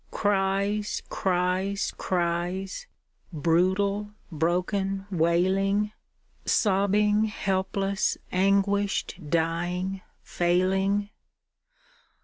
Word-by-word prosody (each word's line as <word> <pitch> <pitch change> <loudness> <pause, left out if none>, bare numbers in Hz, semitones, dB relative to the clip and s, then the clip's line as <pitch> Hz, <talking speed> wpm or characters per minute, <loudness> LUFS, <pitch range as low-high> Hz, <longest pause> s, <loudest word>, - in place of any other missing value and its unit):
Cries, 200 +1 0 0.2
Is, 185 +2 0
criel 175 +1 -1 0.6
brutal 185 +6 +1 0.2
broken, 185 +4 -1
wSling. 190 +4 +2 0.5
Sobbing, 210 +1 +2
helpless, 195 -1 -1
anguished, 195 0 +1
dying, 175 +4 -1 0.2
failing. 190 +3 +1
190 Hz, 55 wpm, -26 LUFS, 180-200 Hz, 0.6 s, wSling